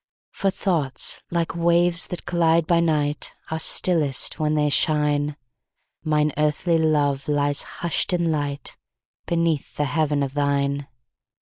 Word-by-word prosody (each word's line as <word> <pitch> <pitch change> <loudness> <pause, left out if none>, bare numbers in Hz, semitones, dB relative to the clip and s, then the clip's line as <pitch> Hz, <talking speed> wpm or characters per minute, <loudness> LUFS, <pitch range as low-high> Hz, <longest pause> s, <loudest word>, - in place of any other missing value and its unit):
For 195 - -1
thoughts, 165 -8 -1
like 170 -1 -2
waves 170 0 +3
that 180 - -7
glide 165 -1 +2
by 170 +1 +2
night, 150 -3 -1 0.2
Are 160 - -2
stillest 160 -5 +3
when 155 0 0
they 150 -1 +1
shine; 150 -1 +1 0.7
Mine 150 -1 +1
earthly 155 +3 +1
love 145 -3 0
lies 145 -1 +1
hush'd 170 +2 -1
in 175 -1 0 1.0
lightBeneath 165 -3 -1
the 150 - -1
heaven 145 0 0
of 135 -1 -4
thine. 140 -1 -1
155 Hz, 125 wpm, -22 LUFS, 145-170 Hz, 1.0 s, waves